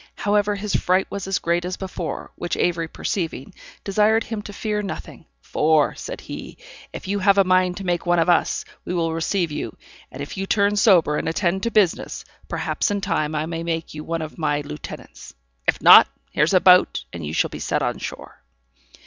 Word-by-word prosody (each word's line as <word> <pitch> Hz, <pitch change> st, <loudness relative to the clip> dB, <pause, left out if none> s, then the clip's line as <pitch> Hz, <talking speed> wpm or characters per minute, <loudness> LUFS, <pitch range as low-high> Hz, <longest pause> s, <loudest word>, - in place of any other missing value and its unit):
However, 205 Hz, 0 st, +1 dB
his 205 Hz, -1 st, -3 dB
fright 185 Hz, +1 st, +2 dB
was 200 Hz, -1 st, -5 dB
as 195 Hz, -, +1 dB
great 170 Hz, +1 st, 0 dB
as 180 Hz, +1 st, -4 dB
before, 185 Hz, -3 st, -5 dB
which 175 Hz, -, -3 dB
Avery 170 Hz, -2 st, 0 dB
perceiving, 160 Hz, -5 st, -4 dB, 0.3 s
desired 215 Hz, +3 st, +2 dB
him 220 Hz, -2 st, -5 dB
to 205 Hz, -, -9 dB
fear 210 Hz, 0 st, -2 dB
nothing; 195 Hz, -4 st, -8 dB, 0.2 s
"for," 155 Hz, -1 st, +2 dB
said -, -, -7 dB
he, -, -, -8 dB, 0.3 s
"if -, -, -8 dB
you 200 Hz, +1 st, -1 dB
have 200 Hz, +1 st, +4 dB
a 195 Hz, -, +6 dB
mind 185 Hz, -1 st, +2 dB
to 195 Hz, -, -6 dB
make 175 Hz, -1 st, 0 dB
one 175 Hz, -1 st, +2 dB
of 165 Hz, -, +2 dB
us, 175 Hz, -2 st, +2 dB, 0.2 s
we 180 Hz, -, -4 dB
will 165 Hz, -2 st, 0 dB
receive 165 Hz, +1 st, -1 dB
you; -, -, -5 dB, 0.3 s
and 130 Hz, -, -10 dB
if 145 Hz, -, -8 dB
you 195 Hz, 0 st, -3 dB
turn 200 Hz, 0 st, +2 dB
sober, 180 Hz, -8 st, +4 dB
and -, -, -1 dB
attend 175 Hz, +2 st, 0 dB
to 235 Hz, -, 0 dB
business, 210 Hz, -6 st, 0 dB, 0.2 s
perhaps -, -, -1 dB
in 205 Hz, 0 st, -1 dB
time 155 Hz, -5 st, -1 dB
I 150 Hz, +1 st, -1 dB
may 165 Hz, 0 st, -4 dB
make 165 Hz, -1 st, -3 dB
you 150 Hz, 0 st, -7 dB
one 165 Hz, 0 st, -3 dB
of 155 Hz, +2 st, -9 dB
my 150 Hz, -2 st, 0 dB
lieutenants; 75 Hz, -, -9 dB, 0.3 s
if -, -, +2 dB
not, -, -, +10 dB, 0.2 s
here's 155 Hz, +6 st, +2 dB
a -, -, +7 dB
boat, 180 Hz, 0 st, +5 dB
and 85 Hz, -1 st, -6 dB
you 75 Hz, -, -4 dB
shall -, -, +1 dB
be -, -, -7 dB
set -, -, -1 dB
on -, -, -2 dB
shore." -, -, -8 dB
180 Hz, 205 wpm, -22 LUFS, 165-200 Hz, 0.3 s, not